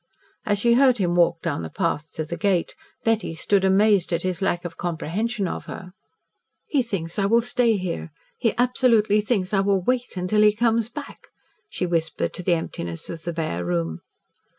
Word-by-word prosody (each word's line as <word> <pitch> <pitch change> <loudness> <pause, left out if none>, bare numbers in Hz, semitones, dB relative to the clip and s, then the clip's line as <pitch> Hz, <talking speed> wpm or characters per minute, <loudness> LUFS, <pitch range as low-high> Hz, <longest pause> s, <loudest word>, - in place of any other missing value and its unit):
As 205 - +2
she 235 +3 +3
heard 255 0 +5
him 180 -4 0
walk 170 -1 +2
down - - -1
the 80 - -5
path 155 - -2
to 155 - -3
the 170 - -5
gate, 190 -4 0 0.3
Betty 225 -7 0
stood 195 +4 +1
amazed 195 -1 +3
at 170 0 0
his 185 0 -2
lack 175 -2 0
of 170 - -6
comprehension 190 +6 -2
of - - -5
her. 180 - -8 0.7
"He 285 - +1
thinks 195 -7 -4
I 195 - +2
will 230 +3 +4
stay 235 -2 +2
here. 180 -3 -4 0.3
He 230 -2 +1
absolutely 235 -4 +3
thinks 205 -3 -1
I 195 - +3
will 195 -1 +2
wait 250 -2 -1
until 185 +4 +1
he 210 0 +5
comes 230 0 +1
back," 290 +2 -9 0.4
she 185 - -2
whispered 165 -3 -1
to - - -5
the 175 -1 +2
emptiness 85 - -5
of 165 -1 -7
the 170 - -2
bare 155 - -3
room. 85 -2 -2
190 Hz, 190 wpm, -24 LUFS, 170-225 Hz, 0.7 s, heard